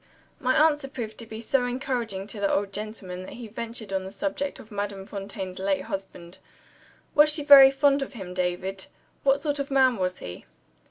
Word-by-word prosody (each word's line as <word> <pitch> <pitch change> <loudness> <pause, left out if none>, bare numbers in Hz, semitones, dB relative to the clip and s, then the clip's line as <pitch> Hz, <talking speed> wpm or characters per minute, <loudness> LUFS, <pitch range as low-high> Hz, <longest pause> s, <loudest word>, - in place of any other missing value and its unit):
My 255 0 +1
answer 300 -2 +3
proved 230 -5 -6
to 230 - -8
be 220 0 -7
so 250 +2 +1
encouraging 245 -6 -3
to 210 +1 -6
the 200 -1 +1
old 200 0 0
gentleman 205 -3 -5
that 185 - -9
he 235 -2 -8
ventured 225 -1 -5
on 190 -1 0
the 190 - -7
subject 285 +7 -3
of 220 - -14
Madame 200 -1 -4
Fontaine's 195 -2 -6
late 190 -1 0
husband. 190 -2 -7 0.7
"Was 300 +1 +6
she 300 -1 +1
very 280 -2 +10
fond 275 +1 +3
of 275 - -5
him, 190 -6 -7
David? 185 +1 -2 0.3
What 275 0 +3
sort 290 -2 -1
of 280 - -3
man 260 -3 +4
was 185 -1 -1
he?" 90 0 -9
220 Hz, 195 wpm, -26 LUFS, 195-270 Hz, 0.7 s, very